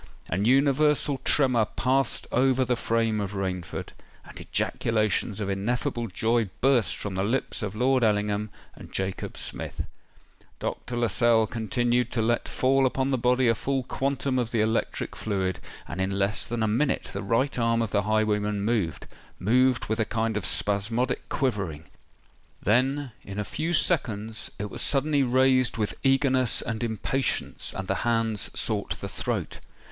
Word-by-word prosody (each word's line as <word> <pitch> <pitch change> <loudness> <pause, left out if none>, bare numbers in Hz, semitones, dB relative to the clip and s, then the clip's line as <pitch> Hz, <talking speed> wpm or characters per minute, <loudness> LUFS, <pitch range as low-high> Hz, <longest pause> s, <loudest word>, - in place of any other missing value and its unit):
An 95 +3 0
universal 140 +2 +3
tremor 125 -6 +3
passed 130 +3 +1
over 130 +1 +3
the 125 - +1
frame 115 -2 0
of 100 0 -4
Rainford; 90 -3 -4 0.4
and - - -8
ejaculations 110 -1 0
of 105 - -2
ineffable 120 +5 -1
joy 115 +2 0
burst 130 -4 +3
from 100 - -5
the 95 +1 -1
lips 125 +6 -1
of 105 -1 -4
Lord 125 +2 +2
Ellingham 105 0 +1 0.2
and - - -13
Jacob 95 -1 -3
Smith. - - -4 0.7
Dr. 120 - -4
Lascelles 115 -1 +3
continued 120 +2 0
to 115 - +1
let 120 +1 0
fall 135 +1 +2
upon 130 +1 -1
the 130 - +2
body 125 +1 +2
a 115 - +5
full 135 +3 -2
quantum 135 0 -1
of 120 -2 -1
the 115 - -1
electric 110 +1 -1
fluid; 95 -4 -2 0.3
and 90 +4 -4
in 95 - 0
less 100 +1 0
than 120 -1 -2
a - - +2
minute 130 +7 0
the 100 - -3
right 115 +6 0
arm 115 0 +2
of 110 - -4
the 100 - +2
highwayman 105 -1 0
moved,—moved 115 - 0
with 110 +2 -2
a 110 - +2
kind 110 0 -1
of 100 -4 -1
spasmodic 115 +5 +1
quivering: 95 - -2 0.7
then, 130 +5 +1
in 100 0 -8
a 105 - -1
few 160 - -3
seconds, 110 - +2
it 105 0 -5
was - - -3
suddenly 145 +1 +3
raised 130 -1 +3
with 105 -2 -1
eagerness 135 -2 +2
and 115 +1 -3
impatience, 115 +3 -1
and 95 -1 -5
the 95 - 0
hand 115 -2 0
sought - - -2
the - - -4
throat. - - -3
115 Hz, 155 wpm, -26 LUFS, 105-130 Hz, 0.7 s, a